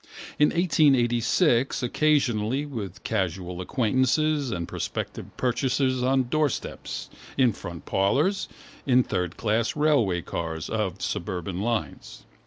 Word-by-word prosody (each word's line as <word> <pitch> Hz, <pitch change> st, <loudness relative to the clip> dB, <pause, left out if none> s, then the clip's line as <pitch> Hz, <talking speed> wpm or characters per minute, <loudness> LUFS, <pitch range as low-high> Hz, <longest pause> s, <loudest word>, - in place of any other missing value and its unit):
In 150 Hz, -, +6 dB
1886 135 Hz, -4 st, +3 dB
occasionally 130 Hz, -2 st, +1 dB
with 110 Hz, -8 st, -6 dB
casual 90 Hz, -3 st, -2 dB
acquaintances 130 Hz, -, +1 dB
and 85 Hz, -6 st, -3 dB
prospective -, -, -4 dB
purchasers 130 Hz, +1 st, +1 dB
on 130 Hz, +1 st, +3 dB
doorsteps, 150 Hz, 0 st, -2 dB, 0.3 s
in 125 Hz, -4 st, +4 dB
front 85 Hz, -3 st, -8 dB
parlours, 145 Hz, -, +1 dB, 0.4 s
in 125 Hz, -1 st, +5 dB
third 90 Hz, -6 st, -2 dB
class 110 Hz, +1 st, 0 dB
railway 130 Hz, -, +2 dB
carriages 80 Hz, -1 st, -4 dB
of 95 Hz, -5 st, -2 dB
suburban 90 Hz, +1 st, -3 dB
lines. 115 Hz, 0 st, -3 dB
120 Hz, 105 wpm, -26 LUFS, 95-140 Hz, 0.4 s, In